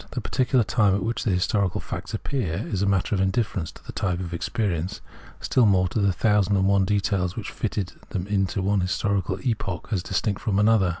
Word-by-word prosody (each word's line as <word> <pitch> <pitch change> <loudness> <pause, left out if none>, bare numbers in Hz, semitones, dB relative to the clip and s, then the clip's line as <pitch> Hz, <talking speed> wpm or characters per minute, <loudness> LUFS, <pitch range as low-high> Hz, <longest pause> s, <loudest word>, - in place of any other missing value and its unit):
The - - -4
particular 130 -1 +1
time 105 -2 +2
at 100 - -1
which 115 +3 -2
the - - +2
historical 95 0 +1
facts - - -5
appeared 105 - -3
is 95 - 0
a 100 - +2
matter 100 +1 +1
of 95 - +1
indifference 95 -3 0
to - - -17
the - - -7
type 90 -3 -1
of 85 -2 -5
experience; 95 0 -2 0.4
still 125 -4 +3
more 95 -2 +4
so 110 - +1
the 100 -1 +3
thousand 105 0 +2
and 95 - +2
one 100 -1 +3
details 95 -2 0
which 115 - -5
fitted 100 -4 -3 0.2
them 95 -4 -3
into 95 -1 0
one 100 0 +2
historical 95 0 0
epoch 100 -7 -2
as 100 -5 +1
distinct 95 +2 -1
from 100 -3 0
another. 105 -3 +4
100 Hz, 205 wpm, -25 LUFS, 95-105 Hz, 0.4 s, more